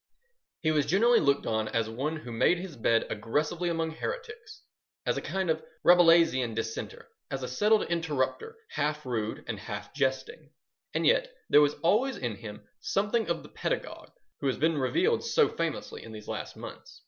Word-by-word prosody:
He 155 - +2
was 150 -2 +1
generally 230 +8 +5
looked 140 0 +2
on 110 -1 0
as 115 0 0
one 135 +8 -2
who 140 -6 -8
made 115 +10 +3
his 175 -3 -7
bed 115 -1 +2
aggressively 150 +11 -1
among 165 -1 -1
heretics, 445 - -6 0.4
as - - +1
a - - -2
kind 190 -1 -2
of 160 -1 0 0.2
Rabelaisian 165 -9 +5
dissenter, 115 0 -5 0.2
as 135 -1 -4
a - - -2
settled 210 +12 +3
interrupter, 165 - -2 0.2
half 150 0 -1
rude 110 -4 -3
and 115 -4 -4
half 105 -1 -7
jesting. 140 +2 -2 0.4
And - - +1
yet - - +3 0.2
there 150 - +8
was 145 0 +3
always 235 +10 +2
in 120 -5 -3
him 105 0 -10
something 210 +1 0
of 170 - -1
the - - -12
pedagogue - - -4 0.3
who 140 - -1
has 130 - 0
been 160 0 +2
revealed 370 - +2
so 465 -1 +3
famously 165 -2 -4
in 115 - -10
these 105 -1 -10
last - - -5
months. - - -10
155 Hz, 175 wpm, -29 LUFS, 125-190 Hz, 0.4 s, there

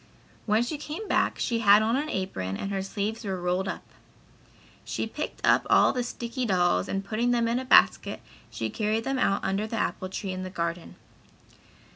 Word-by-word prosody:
When 215 +2 +3
she 290 +4 -4
came 310 +8 -6
back - - +1
she 230 -1 -1
had 210 -1 +6
on 225 +2 +1
an 295 +3 -1
apron 95 - -3
and 195 - -4
her 195 -1 -1
sleeves 205 +4 -3
were 190 -3 -3
rolled 180 +2 -1
up. 185 - -4 1.0
She - - -3
picked - - -5
up - - +4
all - - +5
the 250 - -1
sticky 240 +1 -4
dolls 175 - +2
and 195 0 -2
putting 225 +4 0
them 235 -1 +2
in 235 +2 +1
a 260 - -5
basket 255 - +4 0.3
she - - -4
carried 220 0 -1
them 270 +1 -1
out 195 -5 +1
under 195 +3 -1
the 225 - -5
apple 185 -3 -2
tree 190 0 -4
in 185 0 -4
the 185 - -5
garden. 170 -2 -4
210 Hz, 195 wpm, -27 LUFS, 190-235 Hz, 1.0 s, had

